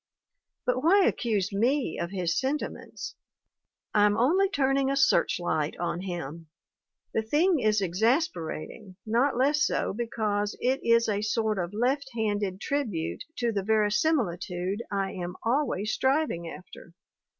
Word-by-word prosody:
But 250 Hz, +1 st, 0 dB
why 380 Hz, +4 st, +5 dB
accuse 205 Hz, -4 st, 0 dB
me 245 Hz, -, +1 dB
of 170 Hz, -, -2 dB
his 175 Hz, -4 st, -1 dB
sentiments? 275 Hz, -, -3 dB, 0.8 s
I'm 205 Hz, 0 st, +4 dB
only 360 Hz, +11 st, +3 dB
turning 270 Hz, -5 st, +1 dB
a 275 Hz, -, +1 dB
searchlight 165 Hz, -, +1 dB
on 175 Hz, 0 st, -2 dB
him. 170 Hz, -3 st, -6 dB, 0.7 s
The 225 Hz, -, +1 dB
thing 310 Hz, +9 st, +2 dB
is 215 Hz, -3 st, +2 dB
exasperating, 195 Hz, -, -1 dB
not 240 Hz, +5 st, +2 dB
less 290 Hz, +4 st, +3 dB
so -, -, 0 dB
because 210 Hz, -2 st, -2 dB
it 260 Hz, +2 st, +1 dB
is 230 Hz, 0 st, +4 dB
a 205 Hz, -1 st, 0 dB
sort 215 Hz, -1 st, 0 dB
of 175 Hz, 0 st, -2 dB
left 265 Hz, +5 st, 0 dB
handed 205 Hz, -4 st, -1 dB
tribute 220 Hz, -, -2 dB
to 240 Hz, -1 st, 0 dB
the 205 Hz, -2 st, -1 dB
verisimilitude 205 Hz, -, 0 dB
I 195 Hz, -1 st, -1 dB
am 180 Hz, -1 st, -5 dB
always 230 Hz, -4 st, 0 dB
striv 285 Hz, +4 st, +2 dB
ing 170 Hz, 0 st, -5 dB
after. 170 Hz, -1 st, -12 dB
215 Hz, 135 wpm, -27 LUFS, 185-265 Hz, 0.8 s, why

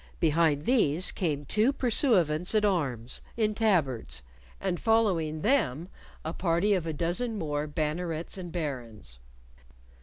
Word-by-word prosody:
Behind 155 Hz, -2 st, +2 dB
these 185 Hz, -, +2 dB
came 150 Hz, -5 st, -2 dB
two 215 Hz, -, +3 dB
pursuivants 215 Hz, -, +2 dB
at 210 Hz, -1 st, +3 dB
arms 135 Hz, -, -1 dB, 0.2 s
in 215 Hz, -2 st, +1 dB
tabards, 135 Hz, -, 0 dB, 0.4 s
and 185 Hz, -3 st, -2 dB
following 180 Hz, -9 st, +1 dB
them 180 Hz, -, +1 dB, 0.4 s
a 160 Hz, -, -3 dB
party 175 Hz, +4 st, +1 dB
of 180 Hz, -4 st, -1 dB
a -, -, -1 dB
dozen 175 Hz, +9 st, -1 dB
more 150 Hz, -4 st, -2 dB
bannerets 155 Hz, +2 st, -2 dB
and 180 Hz, -3 st, -6 dB
barons. 120 Hz, -, -5 dB
165 Hz, 125 wpm, -28 LUFS, 150-205 Hz, 0.4 s, two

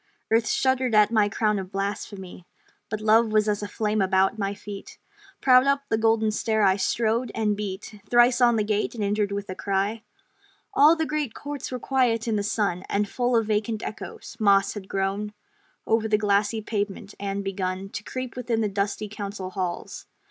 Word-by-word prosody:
Earth 225 Hz, 0 st, +3 dB
shuddered 260 Hz, -3 st, +1 dB
at 210 Hz, 0 st, +5 dB
my 215 Hz, -3 st, +3 dB
crown 210 Hz, -1 st, +1 dB
of 190 Hz, -1 st, -7 dB
blasphemy, 195 Hz, -2 st, -5 dB, 0.4 s
But 215 Hz, -1 st, -3 dB
Love 220 Hz, +1 st, +4 dB
was 215 Hz, 0 st, +3 dB
as 210 Hz, -1 st, 0 dB
a 205 Hz, -, -3 dB
flame 215 Hz, 0 st, -1 dB
about 190 Hz, +2 st, +2 dB
my 200 Hz, 0 st, -1 dB
feet; 200 Hz, -1 st, -9 dB, 0.4 s
Proud 255 Hz, 0 st, +6 dB
up 280 Hz, 0 st, +2 dB
the 220 Hz, -, +2 dB
Golden 225 Hz, -1 st, +2 dB
Stair 220 Hz, 0 st, 0 dB
I 190 Hz, -1 st, +5 dB
strode; 225 Hz, +4 st, 0 dB
and 215 Hz, -2 st, +1 dB
beat 205 Hz, +1 st, -6 dB
Thrice 240 Hz, +1 st, +5 dB
on 240 Hz, -1 st, +5 dB
the 215 Hz, -, +1 dB
Gate, 210 Hz, +2 st, -1 dB
and 220 Hz, -, -3 dB
entered 205 Hz, 0 st, 0 dB
with 200 Hz, 0 st, -3 dB
a -, -, -4 dB
cry 200 Hz, +3 st, -1 dB, 0.7 s
All 300 Hz, +4 st, +6 dB
the 320 Hz, -1 st, -1 dB
great 300 Hz, -6 st, -2 dB
courts 290 Hz, -2 st, -6 dB
were 255 Hz, -, -2 dB
quiet 240 Hz, -3 st, +1 dB
in 225 Hz, -, +1 dB
the 205 Hz, -, +1 dB
sun, 200 Hz, -3 st, -1 dB
And 205 Hz, +1 st, +1 dB
full 245 Hz, +3 st, 0 dB
of 225 Hz, -1 st, +3 dB
vacant 215 Hz, +1 st, -1 dB
echoes: 215 Hz, -, -7 dB
moss 200 Hz, -2 st, +4 dB
had 200 Hz, -2 st, -8 dB
grown 200 Hz, +2 st, -2 dB, 0.5 s
Over 225 Hz, 0 st, +1 dB
the 215 Hz, -1 st, +3 dB
glassy 205 Hz, +1 st, +1 dB
pavement, 205 Hz, -1 st, -4 dB
and 200 Hz, 0 st, -3 dB
begun 190 Hz, 0 st, -3 dB
To 210 Hz, -, -6 dB
creep 255 Hz, 0 st, -5 dB
within 235 Hz, -2 st, -1 dB
the 210 Hz, -, 0 dB
dusty 200 Hz, +2 st, -2 dB
council 200 Hz, -2 st, -6 dB
halls. 185 Hz, -2 st, -4 dB
210 Hz, 190 wpm, -25 LUFS, 200-225 Hz, 0.7 s, Proud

